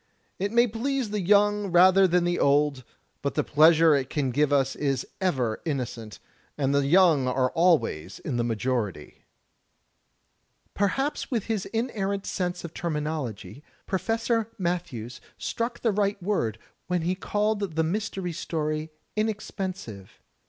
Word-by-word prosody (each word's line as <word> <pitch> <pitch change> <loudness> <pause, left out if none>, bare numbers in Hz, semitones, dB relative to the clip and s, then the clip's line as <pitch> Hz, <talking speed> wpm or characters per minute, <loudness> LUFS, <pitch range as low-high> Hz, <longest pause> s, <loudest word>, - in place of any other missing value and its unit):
It 200 +1 -1
may 235 +1 +5
please 245 +1 -2
the 210 -1 -1
young 205 +2 +3
rather 185 +2 +6
than 180 0 +2
the 175 0 0
old, 140 -1 +2 0.4
but - - -2
the - - +2
pleasure 160 +1 +5
it 135 -2 0
can 140 -4 -1
give 145 +2 +2
is 135 -1 +1 0.2
ever 130 -12 0
innocent; 120 -8 -4 0.4
and 140 -1 +1
the 140 -1 +2
young 165 -5 +5
are 130 0 +1
always 160 - +1
in 130 -5 -4
the 120 - +1
majority." 115 - -3 1.5
Perhaps 270 +9 -1
with 235 -7 -1
his 220 -4 -2
inerrant 200 -4 -2
sense 180 -2 -3
of 170 -1 -7
terminology. 150 - -4 0.2
Professor 225 +3 0
Matthews 170 - -3 0.2
struck 235 +1 -3
the 230 - +2
right 200 0 0
word 120 - 0 0.3
when 180 -2 0
he 175 +2 +1
called 210 +3 -1 0.2
the 160 - +2
Mystery 190 +1 -2
Story 155 -1 -3 0.3
inexpensive. 195 - -4
175 Hz, 135 wpm, -26 LUFS, 135-205 Hz, 1.5 s, rather